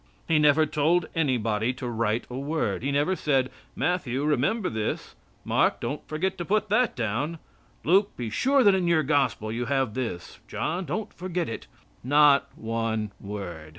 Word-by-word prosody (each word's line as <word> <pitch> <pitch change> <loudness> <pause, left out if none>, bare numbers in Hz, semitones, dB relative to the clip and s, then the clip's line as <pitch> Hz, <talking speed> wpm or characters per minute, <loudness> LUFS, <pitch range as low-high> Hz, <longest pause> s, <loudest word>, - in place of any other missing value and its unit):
He 160 -2 +3
never 150 +1 +5
told 155 +4 +2
anybody 120 -7 0
to 130 0 -7
write 115 -1 -1
a 125 - -7
word. 135 - -1
He 140 +3 -1
never 145 +7 +1
said: 135 -6 +1 0.2
"Matthew, 145 -7 -1
remember 155 - +1
this. 110 -1 -3 0.3
Mark, - - +2
don't 145 - -4
forget 180 +5 -2
to - - -1
put 215 +2 +1
that 240 +4 +2
down. 125 +8 -2 0.5
Luke, 195 +5 +3
be 115 -3 -4
sure 270 - +3
that 200 - +6
in 185 -2 +1
your 165 -2 +3
gospel 130 -7 +1
you 120 +2 -2
have 135 -4 0
this. 115 -9 -5
John, 180 +3 -2
don't 220 +4 -4
forget 180 -1 -3
it." 115 - -6 0.4
Not 145 +2 +5
one 110 -2 -2
word. 90 -6 -7
140 Hz, 165 wpm, -26 LUFS, 115-170 Hz, 0.5 s, that